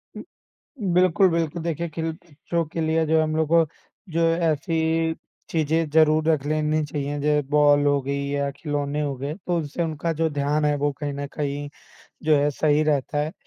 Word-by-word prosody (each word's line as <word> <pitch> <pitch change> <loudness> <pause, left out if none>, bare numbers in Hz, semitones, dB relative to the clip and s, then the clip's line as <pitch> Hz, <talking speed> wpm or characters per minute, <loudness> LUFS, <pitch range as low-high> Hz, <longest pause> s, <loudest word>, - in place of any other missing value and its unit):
हुँ। - - -7 0.7
बिल्कुल, 185 +1 +4
बिल्कुल। 165 0 -1
देखिए, 170 0 -2
खिल 160 +1 -3
बच्चों 170 0 -4
के 165 +2 -5
लिए 160 0 +1
जो 160 +1 +3
हम 155 0 -1
लोग 160 -1 +1
को 165 0 +5 0.4
जो 165 0 -1
ऐसी 160 0 0 0.4
चीज़ें 160 0 0
ज़रूर 155 0 +4
रख 150 -3 +1
लेनी 155 +1 0
चाहिए 145 0 -3
जैसे 150 +1 +2
बॉल 145 -1 +4
हो 145 -1 +3
गई 140 +1 -2
या 140 0 -1
खिलौने 145 0 -3
हो 145 -2 -2
गए, 140 +3 -4
तो 180 0 -3
उससे 155 +2 -3
उनका 160 0 -2
जो 160 +1 0
ध्यान 145 +1 0
है, 150 0 +2
वो 145 +1 0
कहीं 145 0 -5
न 140 0 -4
कहीं 145 -1 -3 0.6
जो 155 -1 +4
है 145 +1 +2
सही 150 +1 +2
रहता 150 -1 0
है। 150 +2 -1
155 Hz, 185 wpm, -24 LUFS, 145-160 Hz, 0.7 s, को